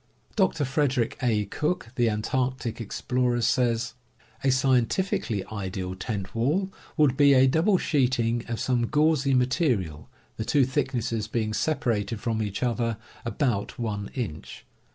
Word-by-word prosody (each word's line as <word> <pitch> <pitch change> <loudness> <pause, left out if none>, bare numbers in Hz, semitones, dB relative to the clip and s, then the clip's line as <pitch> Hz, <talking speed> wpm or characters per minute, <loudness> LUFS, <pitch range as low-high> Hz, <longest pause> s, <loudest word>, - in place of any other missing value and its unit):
Dr. 180 -7 +2
Frederick 130 -3 +1
A. 110 -5 +1
Cook, 150 - -2
the 120 -3 +2
antarctic 120 +2 -2
explorer, 125 +2 0
says: 120 0 +1 0.5
"A 135 - +3
scientifically 130 - +1
ideal 95 -3 -4
tent 95 +1 -5
wall 155 +12 0 0.3
would 145 -4 +4
be 140 0 +6
a 130 0 +6
double 165 +9 +3
sheeting 120 -7 +1
of 115 -2 -3
some 120 -2 +1
gauzy 150 -2 +3
material, 125 - 0 0.3
the 110 - -2
two 140 +3 +3
thicknesses 120 -4 -1
being 110 -1 -1
separated 115 -6 0
from 110 -1 -1
each 105 +2 -3
other 115 -2 0 0.3
about 115 -3 -1
one 105 -4 -3
inch. 110 - -5
120 Hz, 135 wpm, -26 LUFS, 110-135 Hz, 0.5 s, be